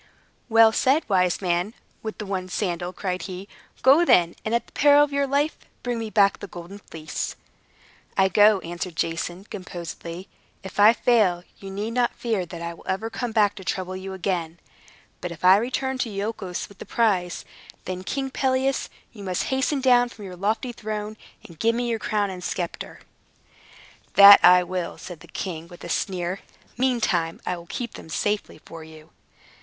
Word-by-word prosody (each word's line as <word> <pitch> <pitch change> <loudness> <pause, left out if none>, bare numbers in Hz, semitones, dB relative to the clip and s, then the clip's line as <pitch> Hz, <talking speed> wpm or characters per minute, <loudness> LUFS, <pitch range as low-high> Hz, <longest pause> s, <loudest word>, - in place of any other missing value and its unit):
"Well 225 0 +7
said, 270 +7 +2
wise 185 -2 +1
man 180 +4 0 0.3
with 220 -1 -6
the 210 - -5
one 190 -2 -3
sandal!" 175 -2 -2
cried 185 -1 -3
he. 185 +2 -7 0.4
"Go, 275 +6 +7
then, 175 - +4
and 220 +2 0
at 235 - 0
the - - -22
peril 290 0 +6
of 290 -1 -2
your 280 0 +1
life, 285 +3 +1 0.3
bring 245 -2 -2
me 225 -1 -4
back 200 -2 +3
the 200 - -7
Golden 175 +3 -10
Fleece." 155 -5 -5 0.8
"I 190 -1 +5
go," 205 +2 +5
answered 175 +1 -5
Jason, 170 +3 -2
composedly. 175 -2 -8 0.4
"If 190 +1 -8
I 210 +2 +9
fail, 210 -8 +2 0.2
you 195 - -8
need 205 +3 -4
not 245 0 +1
fear 215 -7 -2
that 170 0 -8
I 170 0 -4
will 170 - -16
ever 220 +4 -2
come 245 0 -3
back 210 -2 +3
to 190 - -8
trouble 185 0 -3
you 190 +1 -6
again. 175 -3 -3 0.6
But 180 - -4
if 170 +1 -6
I 185 +1 +8
return 260 +3 -2
to 235 - -1
Iolchos 200 -3 -4
with 200 - -18
the - - -8
prize, 190 -7 0 0.4
then, 185 0 -5
King 270 +5 -3
Pelias, 265 0 0 0.2
you 210 -5 -11
must 185 -2 -1
hasten 265 +1 0
down 245 -2 +4
from 215 -3 -11
your 185 -1 -8
lofty 220 +7 -1
throne, 215 -2 -5 0.3
and 165 -3 -16
give 230 +4 +2
me 240 0 -1
your 230 -1 -1
crown 205 -2 -1
and 180 -1 -8
sceptre." 175 -1 -5 1.1
"That 200 0 +10
I 180 0 +7
will," 180 -1 -4
said 175 -3 -9
the - - -15
king, 170 -3 -5
with 175 0 -13
a - - -7
sneer. 180 +1 -2 0.4
"Meantime, 220 -10 0
I 180 - -1
will 170 -1 -11
keep 240 +6 -5
them - - -10
very - - -3
safely 210 -5 -2
for 165 -1 -10
you." 155 0 -14
195 Hz, 185 wpm, -24 LUFS, 180-230 Hz, 1.1 s, That